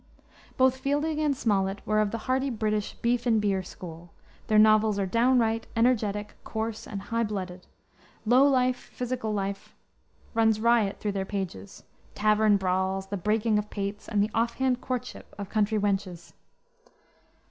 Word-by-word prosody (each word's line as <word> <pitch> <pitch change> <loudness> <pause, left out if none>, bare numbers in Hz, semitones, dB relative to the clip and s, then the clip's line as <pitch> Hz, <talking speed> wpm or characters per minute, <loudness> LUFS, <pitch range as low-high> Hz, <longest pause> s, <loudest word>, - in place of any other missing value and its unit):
Both 260 0 +4
Fielding 295 +3 -1
and 295 -3 +1
Smollett 195 -3 0
were 215 0 +2
of 210 -1 +2
the 230 - -3
hearty 265 +1 +1
British 215 -3 -2
"beef 240 +1 0
and 225 -2 +4
beer" 200 -2 +1
school; 175 -2 -10 0.4
their 215 - +3
novels 215 -1 +5
are 200 - 0
downright, 230 +1 +2
energetic, 215 -3 +1
coarse, 220 0 -4
and 200 - -5
high 230 +2 -1
blooded; 185 -4 -5 0.6
low 245 +4 +5
life, 255 -2 +2
physical 245 -3 -4
life, 200 -1 -4 0.6
runs 225 -2 +3
riot 225 -3 +2
through 210 - -2
their 195 -1 -2
pages 185 - -6 0.3
tavern 215 0 +3
brawls, 190 0 -1
the 205 - -2
breaking 210 +3 +1
of 210 0 -5
pates, 200 0 -5
and 205 -2 +2
the 210 - -2
off 230 +1 0
hand 260 -2 0
courtship 250 -1 -5
of 200 -1 -6
country 215 0 +1
wenches. 195 -4 -2
215 Hz, 155 wpm, -27 LUFS, 200-235 Hz, 0.6 s, novels